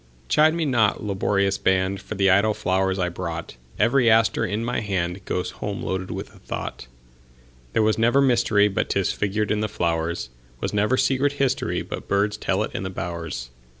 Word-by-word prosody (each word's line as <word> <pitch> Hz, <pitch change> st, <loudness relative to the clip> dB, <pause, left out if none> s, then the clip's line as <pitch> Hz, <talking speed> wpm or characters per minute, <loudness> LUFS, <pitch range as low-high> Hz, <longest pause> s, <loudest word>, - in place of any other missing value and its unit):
Chide 155 Hz, +1 st, +4 dB
me 165 Hz, -2 st, 0 dB
not, 115 Hz, -8 st, +2 dB
laborious 100 Hz, -1 st, 0 dB
band, 95 Hz, +1 st, +1 dB
For 110 Hz, -, -7 dB
the 95 Hz, -1 st, +3 dB
idle 100 Hz, +3 st, +3 dB
flowers 95 Hz, +1 st, 0 dB
I 90 Hz, -2 st, 0 dB
brought; 85 Hz, -3 st, -5 dB, 0.2 s
Every 120 Hz, +2 st, +4 dB
aster 110 Hz, 0 st, +3 dB
in 110 Hz, +1 st, -2 dB
my 120 Hz, -1 st, -1 dB
handGoes 90 Hz, -2 st, -2 dB
home 100 Hz, -1 st, -5 dB
loaded 95 Hz, 0 st, -3 dB
with -, -, -6 dB
a -, -, -17 dB
thought. 60 Hz, -, -6 dB, 0.9 s
There 110 Hz, -, +3 dB
was 110 Hz, +1 st, +2 dB
never 120 Hz, +4 st, +4 dB
mysteryBut 115 Hz, -6 st, +3 dB
'tis 100 Hz, -2 st, +1 dB
figured 105 Hz, +1 st, -1 dB
in 105 Hz, -, +1 dB
the 105 Hz, 0 st, -1 dB
flowers; 85 Hz, -, -2 dB, 0.3 s
SWas -, -, -3 dB
never 105 Hz, +5 st, +2 dB
secret 135 Hz, +2 st, +2 dB
historyBut 135 Hz, -2 st, -1 dB
birds 100 Hz, +1 st, +1 dB
tell -, -, 0 dB
it -, -, -6 dB
in -, -, -3 dB
the 95 Hz, -, -3 dB
bowers. 85 Hz, -8 st, -5 dB
100 Hz, 175 wpm, -24 LUFS, 95-110 Hz, 0.9 s, Chide